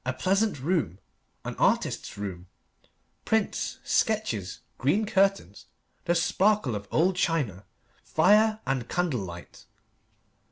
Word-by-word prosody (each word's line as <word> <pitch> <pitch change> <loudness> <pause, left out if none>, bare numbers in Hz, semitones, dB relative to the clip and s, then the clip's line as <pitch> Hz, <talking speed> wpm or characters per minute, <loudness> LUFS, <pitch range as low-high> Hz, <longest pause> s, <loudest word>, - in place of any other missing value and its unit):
A 130 - -2
pleasant 195 +6 0
room 155 - -1 0.5
an - - -4
artist's - - 0
room 95 -3 -6 0.8
prints, 220 -2 -1
sketches, 125 - -1 0.2
green 180 - +2
curtains, 195 -1 0 0.4
the 175 -1 +2
sparkle 190 - +2
of 100 -1 -5
old 180 +4 +2
china, 140 - -1 0.4
fire 215 +6 +3
and 130 -3 -2
candle 175 -8 0
light. 90 -2 -10
165 Hz, 110 wpm, -27 LUFS, -, 0.8 s, fire